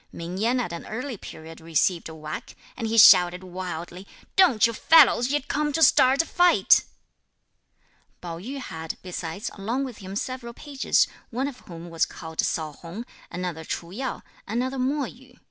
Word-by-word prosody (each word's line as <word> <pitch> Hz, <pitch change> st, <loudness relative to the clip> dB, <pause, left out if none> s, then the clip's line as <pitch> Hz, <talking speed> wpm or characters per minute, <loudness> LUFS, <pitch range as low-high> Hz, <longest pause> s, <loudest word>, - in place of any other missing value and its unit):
Ming 170 Hz, +3 st, -6 dB
Yen 240 Hz, +4 st, +1 dB
at 200 Hz, -8 st, -3 dB
an 170 Hz, -, -7 dB
early 250 Hz, +3 st, -4 dB
period 160 Hz, -4 st, -11 dB
received 165 Hz, +1 st, 0 dB
a 160 Hz, -, -9 dB
whack, 155 Hz, 0 st, -7 dB, 0.2 s
and 225 Hz, -, -3 dB
he 225 Hz, +1 st, -1 dB
shouted 180 Hz, -3 st, +7 dB
wildly, 180 Hz, 0 st, -7 dB, 0.3 s
"Don't 345 Hz, -, +5 dB
you 230 Hz, -, 0 dB
fellows 275 Hz, -2 st, +5 dB
yet 290 Hz, 0 st, -1 dB
come 300 Hz, 0 st, 0 dB
to 325 Hz, -, +2 dB
start 265 Hz, +2 st, +5 dB
a -, -, -12 dB
fight." 355 Hz, +1 st, +4 dB, 1.3 s
Pao 170 Hz, -2 st, -7 dB
yü 255 Hz, +10 st, -6 dB
had, 160 Hz, -10 st, -6 dB
besides, 180 Hz, +1 st, -5 dB
along 230 Hz, +7 st, -2 dB
with 255 Hz, -5 st, -7 dB
him 195 Hz, -1 st, -8 dB
several 240 Hz, +1 st, -4 dB
pages, 280 Hz, -3 st, +1 dB, 0.2 s
one 255 Hz, +4 st, -2 dB
of 270 Hz, -3 st, -8 dB
whom 170 Hz, -1 st, -9 dB
was 165 Hz, -, +1 dB
called 160 Hz, -1 st, -5 dB
Sao 155 Hz, -2 st, -2 dB
Hung, 175 Hz, +10 st, -9 dB, 0.2 s
another 175 Hz, -2 st, -5 dB
Ch'u 170 Hz, +1 st, -5 dB
Yo, 260 Hz, +2 st, -4 dB, 0.2 s
another 255 Hz, +5 st, -2 dB
Mo 275 Hz, +3 st, 0 dB
Yü. 250 Hz, +1 st, -14 dB
210 Hz, 170 wpm, -25 LUFS, 170-260 Hz, 1.3 s, shouted